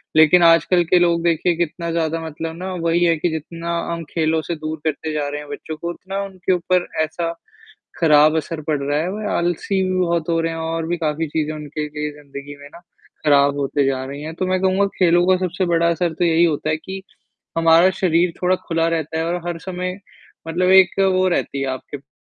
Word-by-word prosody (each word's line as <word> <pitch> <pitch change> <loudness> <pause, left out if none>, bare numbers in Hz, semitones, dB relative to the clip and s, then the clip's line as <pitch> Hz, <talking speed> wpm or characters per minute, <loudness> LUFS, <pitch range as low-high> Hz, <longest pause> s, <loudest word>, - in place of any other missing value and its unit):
लेकिन 160 +3 +6
आजकल 170 +2 +5
के 180 +2 +4
लोग 170 -1 +2
देखिए 170 +1 +1
कितना 170 0 -2
ज़्यादा 165 -1 -1
मतलब 160 +1 -5
ना 185 +1 -5
वही 170 +1 +2
है 165 -1 +3
कि 175 - 0
जितना 165 +2 -5 0.2
हम 170 0 -5
खेलों 160 -1 0
से - - -1
दूर 155 0 -5
करते 155 0 -2
जा 150 -1 -1
रहे 145 +1 -4
हैं 150 - -12
बच्चों 155 +2 -6
को, 170 +2 -5
उतना 195 +3 -5
उनके 190 -2 -3
ऊपर 180 0 0 0.2
ऐसा 165 +2 -3 0.7
खराब 155 -1 +5
असर 160 0 -4
पड़ 150 -3 0
रहा 145 +1 0
है, 170 - -1
वो 210 +1 -4
आलसी 175 +3 0
भी 185 - 0
बहुत 170 -2 0
हो 165 0 +2
रहे 165 0 -1
हैं 165 - -5
और 160 0 -3
भी 175 +1 -1
काफ़ी 160 0 -1
चीज़ें 155 0 -2
उनके 150 0 -5
लिए 150 0 -4
ज़िंदगी 140 0 -9
में 145 - -10
ना, - - -12 0.5
खराब 140 -1 +4
होती 140 0 0
जा 130 -1 -1
रही 140 +2 -7
हैं। 160 +1 -6
तो 185 - -2
मैं 185 0 +1
कहूँगा 190 +1 +2
खेलों 175 -1 +4
का 185 - +5
सबसे 180 +2 -2
बड़ा 170 -1 +2
असर 170 0 0
तो 175 - 0
यही 165 0 +3
होता 155 -1 -1
है 155 - +1
कि, 190 +4 -8 0.6
हमारा 165 +2 +5
शरीर 170 -1 +2
थोड़ा 180 +1 +3
खुला 165 0 +1
रहता 160 -1 -2
है 165 - -1
और 170 +1 -1
हर 170 -1 -3
समय 180 +1 -4 0.5
मतलब 180 +3 +1
एक 190 0 +5
वो 185 -1 +3
रहती 140 -5 -1
है 135 - -1
आपके 130 +2 -7
पास 70 - -28
165 Hz, 220 wpm, -20 LUFS, 155-175 Hz, 0.7 s, लेकिन